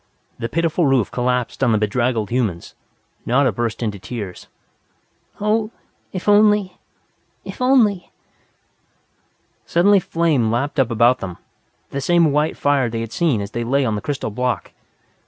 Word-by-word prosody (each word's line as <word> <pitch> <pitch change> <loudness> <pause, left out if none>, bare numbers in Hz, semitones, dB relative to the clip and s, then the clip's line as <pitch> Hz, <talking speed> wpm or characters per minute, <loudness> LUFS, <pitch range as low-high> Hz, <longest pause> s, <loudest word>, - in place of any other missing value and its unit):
The 115 - -3
pitiful 165 +2 +1
roof 135 -5 +2
collapsed 125 +1 -1
on 120 -4 +3
the - - +3
bedraggled 110 0 0
humans. 110 -9 -2 0.5
Nada 130 +1 +2
burst 115 +2 -3
into 105 -3 -3
tears. 95 -1 -7 0.9
"Oh, 215 +1 0 0.4
if 185 +1 -6
only 205 -2 +3 0.7
if - - -8
only 230 -8 +3 0.8
" - - -44
Suddenly 195 +4 +5
flame 160 -10 0
lapped 140 +6 -1
up 130 -3 +2
about 120 +2 +3
them, 90 -3 -6 0.5
the 140 - -3
same 170 0 +3
white 150 +2 0
fire 140 -4 +1
they 115 0 -3
had 115 -1 -6
seen 145 -10 +1
as 100 +1 -6
they 120 - -3
lay 135 +3 +1
on 110 - 0
the 105 - -3
crystal 140 -6 -3
block. 125 +4 -2
130 Hz, 150 wpm, -20 LUFS, 115-170 Hz, 0.9 s, Suddenly